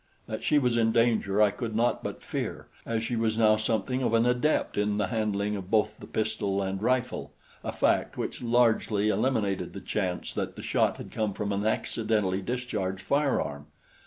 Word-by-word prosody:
That 110 Hz, -, -5 dB
she 150 Hz, -, +3 dB
was 125 Hz, -4 st, +2 dB
in 115 Hz, -1 st, +3 dB
danger 110 Hz, -3 st, +3 dB
I 105 Hz, -, +4 dB
could 110 Hz, +1 st, -4 dB
not 120 Hz, +2 st, +2 dB
but -, -, -5 dB
fear, -, -, -4 dB, 0.2 s
as 115 Hz, -1 st, -1 dB
she 120 Hz, -, -2 dB
was 110 Hz, -1 st, 0 dB
now 110 Hz, -1 st, +5 dB
something 110 Hz, +3 st, -1 dB
of 115 Hz, -2 st, +2 dB
an 115 Hz, +1 st, +4 dB
adept 125 Hz, +5 st, +1 dB
in 105 Hz, 0 st, +1 dB
the 105 Hz, -, 0 dB
handling 105 Hz, -2 st, 0 dB
of 95 Hz, -2 st, -6 dB
both 110 Hz, -1 st, +1 dB
the -, -, -10 dB
pistol 105 Hz, -3 st, -1 dB
and 95 Hz, 0 st, -2 dB
rifle, 125 Hz, +2 st, 0 dB, 0.3 s
a -, -, -2 dB
fact -, -, +1 dB
which -, -, -4 dB
largely 115 Hz, -3 st, +2 dB
eliminated 110 Hz, -4 st, 0 dB
the -, -, -6 dB
chance 90 Hz, -4 st, -2 dB
that -, -, -3 dB
the -, -, -8 dB
shot -, -, +1 dB
had -, -, -9 dB
come 110 Hz, -2 st, -1 dB
from 100 Hz, +1 st, -3 dB
an 100 Hz, +2 st, 0 dB
accidentally 105 Hz, -4 st, 0 dB
discharged 95 Hz, -5 st, -3 dB
firearm. 135 Hz, -, 0 dB
110 Hz, 190 wpm, -28 LUFS, 100-120 Hz, 0.3 s, now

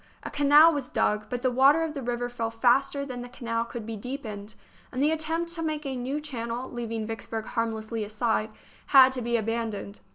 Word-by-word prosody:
A -, -, -6 dB
canal 295 Hz, +3 st, +6 dB
was 280 Hz, -4 st, -3 dB
dug, 210 Hz, 0 st, 0 dB
but 245 Hz, 0 st, -4 dB
the 255 Hz, -, +2 dB
water 275 Hz, +6 st, +5 dB
of 320 Hz, -2 st, -3 dB
the 280 Hz, -, -5 dB
river 245 Hz, 0 st, -2 dB
fell 235 Hz, -2 st, -3 dB
faster 265 Hz, +5 st, +2 dB
than 250 Hz, -3 st, -6 dB
the 245 Hz, -, -8 dB
canal 230 Hz, -2 st, -2 dB
could 235 Hz, -1 st, -7 dB
be 225 Hz, 0 st, -5 dB
deepened, 215 Hz, -3 st, -6 dB, 0.4 s
and 255 Hz, -, -4 dB
the 295 Hz, +3 st, +3 dB
attempt 325 Hz, +2 st, -1 dB
to 335 Hz, -, -2 dB
make 310 Hz, -2 st, -2 dB
a 270 Hz, -1 st, -3 dB
new 260 Hz, +4 st, -2 dB
channel, 245 Hz, -4 st, -4 dB
leaving 230 Hz, -2 st, -4 dB
Vicksburg 225 Hz, 0 st, -5 dB
harmlessly 225 Hz, -1 st, -2 dB
aside, 215 Hz, +1 st, -1 dB, 0.4 s
had 265 Hz, -2 st, +8 dB
to 260 Hz, -1 st, -4 dB
be 235 Hz, 0 st, +1 dB
abandoned. 220 Hz, -2 st, -3 dB
245 Hz, 200 wpm, -27 LUFS, 225-280 Hz, 0.4 s, had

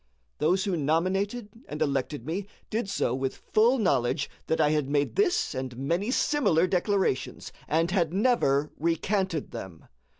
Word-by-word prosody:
Those 180 Hz, +5 st, +2 dB
who 195 Hz, -3 st, 0 dB
nominated 185 Hz, -, 0 dB, 0.2 s
and 150 Hz, -, -6 dB
elected 140 Hz, -3 st, -1 dB
me 185 Hz, +6 st, -3 dB, 0.2 s
did 220 Hz, -2 st, -1 dB
so 125 Hz, -, 0 dB
with 130 Hz, 0 st, -2 dB, 0.2 s
full 235 Hz, +5 st, +5 dB
knowledge 140 Hz, -, +1 dB, 0.2 s
that 160 Hz, -, 0 dB
I 150 Hz, -1 st, +4 dB
had 150 Hz, -3 st, 0 dB
made 145 Hz, 0 st, 0 dB
this 395 Hz, -, +2 dB
and 130 Hz, -2 st, -5 dB
many 170 Hz, -, -1 dB
similar 205 Hz, -, +2 dB
declarations, 185 Hz, -5 st, -1 dB, 0.2 s
and 165 Hz, +3 st, +1 dB
had 175 Hz, -4 st, +1 dB
never 175 Hz, -, +2 dB
recanted 170 Hz, +1 st, -1 dB
them. 85 Hz, -4 st, -8 dB
165 Hz, 145 wpm, -27 LUFS, 145-200 Hz, 0.2 s, full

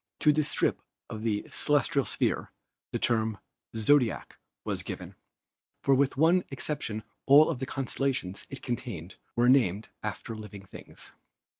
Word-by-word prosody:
To 150 Hz, -, +6 dB
this 150 Hz, 0 st, 0 dB
strip -, -, +1 dB, 0.3 s
of 110 Hz, -, -5 dB
the 110 Hz, -2 st, -1 dB
celestial 145 Hz, -2 st, +2 dB
sphere -, -, -1 dB, 0.4 s
the -, -, 0 dB
term 110 Hz, -2 st, +1 dB, 0.4 s
"zodiac" 115 Hz, +1 st, +2 dB, 0.3 s
was -, -, -2 dB
given, -, -, -7 dB, 0.7 s
for 135 Hz, -, +4 dB
with 135 Hz, 0 st, +2 dB
one 170 Hz, +5 st, +5 dB
exception 125 Hz, -6 st, -3 dB, 0.2 s
all 145 Hz, +4 st, +8 dB
of 140 Hz, -, -4 dB
the 130 Hz, -, -3 dB
constellations 135 Hz, -7 st, -2 dB
it 135 Hz, -, -8 dB
contained 110 Hz, -, -5 dB, 0.2 s
were 120 Hz, +1 st, +3 dB
named 115 Hz, -6 st, +3 dB
after 105 Hz, +2 st, -4 dB
living 105 Hz, -2 st, -9 dB
things. -, -, -12 dB
125 Hz, 140 wpm, -29 LUFS, 110-140 Hz, 0.7 s, all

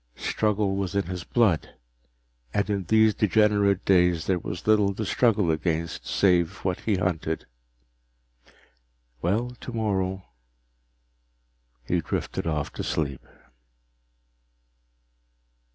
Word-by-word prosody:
Struggle 105 Hz, -2 st, 0 dB
was 100 Hz, 0 st, -3 dB
in 100 Hz, -, +1 dB
his 90 Hz, -1 st, -5 dB
blood, 105 Hz, -9 st, +1 dB, 0.8 s
and 100 Hz, -, +1 dB
in 100 Hz, -2 st, -1 dB
these 110 Hz, +3 st, +4 dB
degenerate 100 Hz, -2 st, +2 dB
days 90 Hz, -3 st, +3 dB
there 95 Hz, -2 st, +1 dB
was 85 Hz, +1 st, -6 dB
little 105 Hz, -2 st, +3 dB
to 110 Hz, -, -3 dB
struggle 105 Hz, -5 st, +2 dB
against 80 Hz, -5 st, -2 dB
save 90 Hz, -1 st, +2 dB
what 90 Hz, -2 st, 0 dB
he 110 Hz, -, 0 dB
hunted. 90 Hz, -3 st, -2 dB, 1.8 s
Well 110 Hz, +8 st, 0 dB
tomorrow 95 Hz, -5 st, -2 dB, 1.6 s
he 85 Hz, +6 st, 0 dB
drifted 80 Hz, -, -3 dB
off 75 Hz, -2 st, -2 dB
to -, -, -5 dB
sleep. 70 Hz, -4 st, -2 dB
95 Hz, 105 wpm, -26 LUFS, 85-105 Hz, 1.8 s, these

